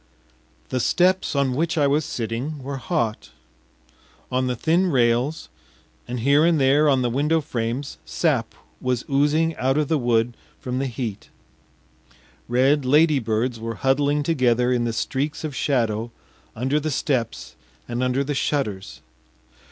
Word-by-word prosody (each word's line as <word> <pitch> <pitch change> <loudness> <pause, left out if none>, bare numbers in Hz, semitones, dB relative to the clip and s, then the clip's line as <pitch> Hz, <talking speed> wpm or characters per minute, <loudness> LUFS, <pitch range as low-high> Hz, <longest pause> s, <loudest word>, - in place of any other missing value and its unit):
The 130 - -1
steps 185 +5 +2
on 140 -2 +1
which 165 +5 -1
I 145 - +3
was 145 +3 +2
sitting 130 +2 -4
were 140 +1 -4
hot; 115 -3 -2 1.0
on 130 0 0
the 125 - -1
thin 165 +9 +2
rails 125 +2 +1 0.6
and 125 -1 -4
here 140 +5 +4
and 165 -2 +3
there 140 +3 +4
on 130 -2 +3
the 120 - +1
window 150 +6 +2
frames 130 -2 -4
sap 140 -9 -1 0.3
was 125 -1 -1
oozing 150 +4 +2
out 130 +3 +1
of 150 -2 0
the 160 - +2
wood 120 -1 +1 0.2
from 125 0 -3
the 135 - -1
heat; 115 -4 -5 1.2
red 135 +4 +3
ladybirds 130 -5 +2
were 115 0 -4
huddling 145 +2 +1
together 125 -5 +2
in 120 -1 0
the 115 - -1
streaks 140 +7 -2
of 150 -3 -4
shadow 115 -5 0 0.5
under 130 +5 0
the 155 +1 -2
steps 130 -5 -2 0.3
and 120 +1 -3
under 130 +2 +1
the 145 +1 -2
shutters. 120 -9 -2
130 Hz, 145 wpm, -23 LUFS, 120-150 Hz, 1.2 s, here